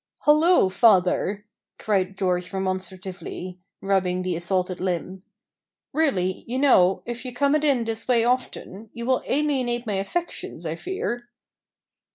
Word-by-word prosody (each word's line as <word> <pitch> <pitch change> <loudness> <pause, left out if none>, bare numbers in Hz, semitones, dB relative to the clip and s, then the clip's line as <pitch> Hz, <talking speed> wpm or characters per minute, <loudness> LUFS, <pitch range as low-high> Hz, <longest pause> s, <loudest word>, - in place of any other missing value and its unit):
"Hallo! 305 - +5
father," 200 0 +3 0.3
cried 195 -2 0
George 180 -1 -1
remonstratively, 185 -1 -5 0.2
rubbing 185 -2 +1
the 180 -1 -1
assaulted 180 +1 -1
limb; 185 +1 -3 0.7
"really, 190 - +1
you 245 +2 -2
know, 195 -10 +4
if 240 +1 -5
you 255 - -5
come 280 +4 +1
it 305 0 +2
in 275 -6 +3
this 225 0 -4
way 240 -3 +3
often, 230 -4 -2
you 235 0 -6
will 255 0 +2
alienate 260 -4 0
my 210 - -2
affections, 195 - -4
I 160 0 -2
fear." 240 - -4
200 Hz, 135 wpm, -24 LUFS, 185-250 Hz, 0.7 s, Hallo